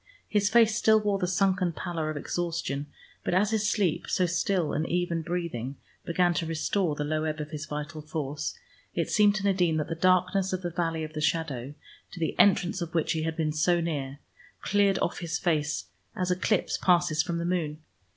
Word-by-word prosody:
His 205 -1 +2
face 225 -1 +5
still 220 -1 +5
wore 205 -2 0
the 180 - 0
sunken 190 -2 +1
pallor 165 -2 -3
of 155 - -3
exhaustion, 150 -3 -2 0.4
but - - 0
as 200 +3 +3
his 215 -1 +1
sleep, 175 -6 0
so 185 - +2
still 175 -1 0
and 155 +2 -1
even 175 -1 0
breathing, 160 -7 -3 0.3
began 175 +1 +2
to 165 -1 -2
restore 165 +1 0
the 150 - -2
low 155 +1 -1
ebb 155 -1 -2
of 150 0 -5
his 155 -1 -5
vital 150 +2 -5
force, 150 -1 -4 0.4
it - - -1
seemed 210 -1 +5
to 205 - -2
Nadine 180 -5 +2
that 150 - -2
the - - -1
darkness 185 +2 +2
of 185 0 -2
the 175 - -2
valley 165 -2 -1
of 155 0 -6
the 155 - -4
shadow, 145 -4 -1 0.4
to - - -8
the 160 - 0
entrance 185 -2 +4
of 170 0 -5
which 165 - +1
he 160 -1 0
had 160 +1 -2
been 155 -2 0
so 175 +3 +2
near, 145 -5 -3 0.5
cleared 200 -1 +3
off - - -2
his 170 -2 -2
face 150 - -1 0.3
as 180 -1 -1
eclipse 190 +2 +1
passes 175 -4 +3
from 170 -1 -2
the 170 - -2
moon. 170 -4 -1
170 Hz, 200 wpm, -28 LUFS, 155-185 Hz, 0.5 s, face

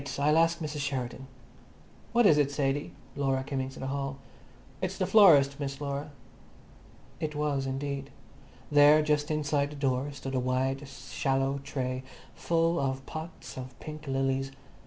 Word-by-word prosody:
I'll 150 +3 +4
ask 165 0 +3
Mrs 150 -2 -4
Sheridan." 135 -2 -3 0.8
"What 240 0 +4
is 150 -6 +6
it, 145 -1 +3
Sadie?" 140 0 -1 0.2
Laura 135 -2 0
came 135 -1 -2
into 130 0 -6
the - - -4
hall. 135 0 -3 0.6
"It's - - -2
the - - +1
florist, 145 -10 +6
Miss 140 -1 -4
Laura." 140 +1 -3 1.1
It 155 -1 -3
was, 145 -2 0
indeed. 140 +1 -3 0.6
There, 145 +1 +7
just 150 0 +1
inside 145 -2 0
the 150 - -9
door, 135 0 0
stood 135 -1 -6
a 130 - +1
wide, 130 +2 -1
shallow 135 0 -1
tray 130 -2 -3 0.3
full 165 0 +1
of 135 -1 -2
pots 160 -2 -8
of 130 -1 -9
pink 155 -1 -8
lilies. 135 0 0
140 Hz, 150 wpm, -29 LUFS, 135-150 Hz, 1.1 s, There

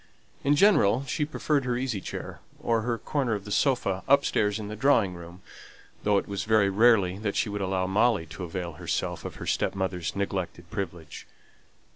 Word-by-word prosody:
In 145 +1 +3
general, 140 - +4
she 150 +3 -1
preferred 150 -2 0
her 125 -1 -1
easy 125 -6 -2
chair, - - -7 0.2
or 115 -1 +1
her 115 +1 -1
corner 125 -1 -1
of 100 0 -7
the 105 - -8
sofa, 100 -8 +1
upstairs 120 -7 +3
in 105 -2 -6
the 105 - -6
drawing 110 -5 +3
room, 85 +1 -11 0.6
though 105 -1 +2
it - - -1
was 100 -1 -3
very 105 -2 +3
rarely 100 -3 +4
that 105 -2 -2
she 110 - +1
would 100 0 -3
allow 95 -1 0
Molly 100 -1 +2
to 80 +4 -8
avail 90 0 -4
herself - - -3
of - - -6
her - - -8
stepmother's 95 -3 -1
neglected 95 -3 -3
privilege. 85 -5 -6
100 Hz, 180 wpm, -27 LUFS, 95-120 Hz, 0.6 s, general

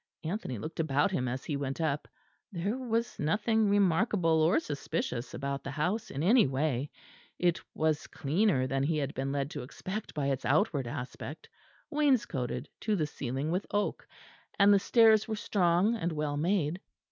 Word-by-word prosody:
Anthony 160 - -3
looked 155 +12 -7
about 150 +3 +2
him 130 -8 -1
as 130 +2 -4
he 150 - -2
went 140 0 -3
up: 150 -3 -1 0.4
there 195 +4 -2
was 235 -2 -2
nothing 210 +6 +2
remarkable 185 -4 +3
or 160 +3 +4
suspicious 140 -5 -3
about 140 0 -3
the - - -5
house 175 +10 -1
in 140 - -3
any 220 - +5
way. 135 0 -1 0.5
It 175 -1 +1
was 155 -1 0
cleaner 155 -1 +1
than 135 +1 -1
he 155 +3 +1
had 140 -1 -2
been 135 +1 -2
led 140 +1 -2
to 145 - -5
expect 185 - -6
by 145 -2 -1
its 130 -1 -2
outside 145 - +1
aspect; 125 +6 -6 0.4
wainscoted 255 - +1
to 215 -1 0
the 160 -6 +1
ceiling 140 +1 -3
with 185 +4 -1
oak; 205 0 -1 0.5
and 205 0 +6
the 200 - +5
stairs 220 0 +5
were 220 - -2
strong 190 0 +2
and 175 -7 -1
well 150 -1 -2
made. 170 +1 0
160 Hz, 170 wpm, -30 LUFS, 140-205 Hz, 0.5 s, and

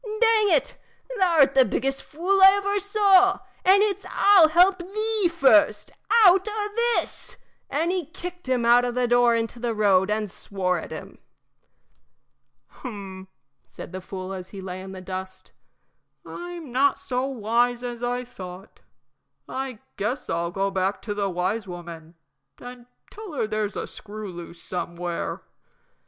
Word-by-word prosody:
Dang 435 -1 +2
it! - - +1 0.4
thou 355 -3 +2
'rt 270 0 +4
the 265 - +6
biggest 270 +2 -2
fool 370 +6 -1
I 385 0 +9
ever 405 0 0
saw, 390 -1 +4 0.3
and 390 +2 +5
it's 400 -1 -1
I'll 395 -5 +6
help 360 +4 +4
thee 425 +2 +3
first 215 -10 +3 0.3
out 380 +2 +5
o' 420 -1 -2 0.3
this!" - - -5 0.3
And 325 +4 0
he 365 -5 -2
kicked 355 -3 -9
him 250 -2 +1
out 240 +1 +5
of 245 -1 -2
the 250 -1 +1
door 240 0 +4
into 230 +1 -3
the 235 -1 -2
road 195 -2 +3
and 210 0 -1
swore 180 -2 -2
at - - -9
him. - - -9 1.5
"Hum," 195 -6 -9 0.4
said - - -11
the 185 0 -6
fool, 185 0 -7
as 185 -1 -8
he 200 - -9
lay 185 -1 -7
in 190 0 -9
the 190 -1 -9
dust, 185 0 -8 0.7
"I'm 345 -5 -8
not 275 +3 +2
so 255 +1 -3
wise 240 0 0
as 240 -1 -6
I 245 +1 -2
thought. 185 -5 -11 0.7
I 265 -3 -5 0.2
guess 245 +6 -3
I'll 170 +1 -1
go 195 +2 -2
back 190 +1 -2
to 210 - -3
the 200 -1 -2
wise 190 +4 -2
woman 170 -2 -10 0.4
and 245 -1 -11 0.2
tell 420 -5 -10
her 265 - -1
there's 215 -1 -3
a - - -3
screw 215 -1 -9
loose 170 -1 -11
somewhere." 175 -1 -5
245 Hz, 155 wpm, -24 LUFS, -, 1.5 s, I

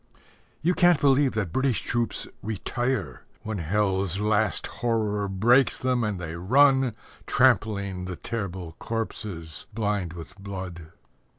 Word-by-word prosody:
You 175 +3 +3
can't 175 -3 +5
believe 140 -1 +4
that 105 -6 -2
British 130 -3 +1
troops 120 -3 -1
"retire" 110 - -2 0.2
When 110 -2 -3
hell's 95 +1 0
last 105 0 +1
horror 105 -4 -1
breaks 120 +8 +3
them, 125 -2 0
and 105 -4 -2
they 85 -2 -5
run, 130 +6 +4 0.3
Trampling 100 -7 +2
the 90 -1 -5
terrible 95 -6 -5
corpses 100 -8 -4
blind 105 -6 -1
with 85 -2 -10
blood. 95 -4 -7
105 Hz, 120 wpm, -26 LUFS, 95-120 Hz, 0.3 s, can't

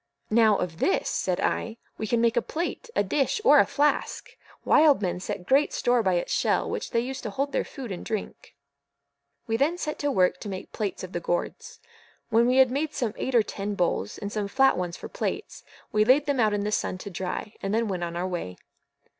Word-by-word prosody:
"Now, 220 -2 +5
of 170 -2 -4
this," 195 - +1
said 180 -2 -1
I, 225 0 -1 0.2
"we 220 - -2
can 235 +2 +1
make 235 0 +3
a 240 - +3
plate, 350 - -4
a - - +3
dish, 275 - 0
or 295 - +8
a - - +4
flask. 290 +1 0 0.3
Wild 300 -2 +5
men 180 -1 -1
set 180 0 -5
great 275 +7 +3
store 245 0 +2
by 190 -4 +1
its 175 - -1
shell, - - +1
which - - -4
they 230 - +1
use 260 +2 -5
to - - -4
hold 275 +7 -2
their - - 0
food 255 -6 -8
and 180 - -5
drink." 215 -3 -6 0.9
We 225 0 0
then 310 +8 +1
set 305 -3 -4
to 290 - 0
work 185 -7 +2
to 205 - -6
make 190 -1 -7
plates 205 -4 -3
of 185 - -7
the 175 - -2
gourds. 175 +1 -3 0.5
When 230 +2 +4
we 255 +1 +3
had 260 -2 +6
made 295 +3 -2
some 225 -4 -1
eight 260 - -3
or 230 - +6
ten 205 0 -4
bowls, 170 - -1
and 205 - -5
some 210 -1 -2
flat 270 +6 +4
ones 180 -1 -3
for - - -8
plates, - - -4 0.3
we 215 0 +3
laid 265 +6 +4
them 285 -3 0
out 215 -2 +3
in 205 - -1
the 210 - -2
sun 185 - -1
to 200 +2 -8
dry, 190 +4 -4
and 195 - -2
then 225 +1 +1
went 185 -3 -3
on 170 0 -4
our 180 +2 -2
way. 170 - -5
220 Hz, 230 wpm, -26 LUFS, 185-265 Hz, 0.9 s, or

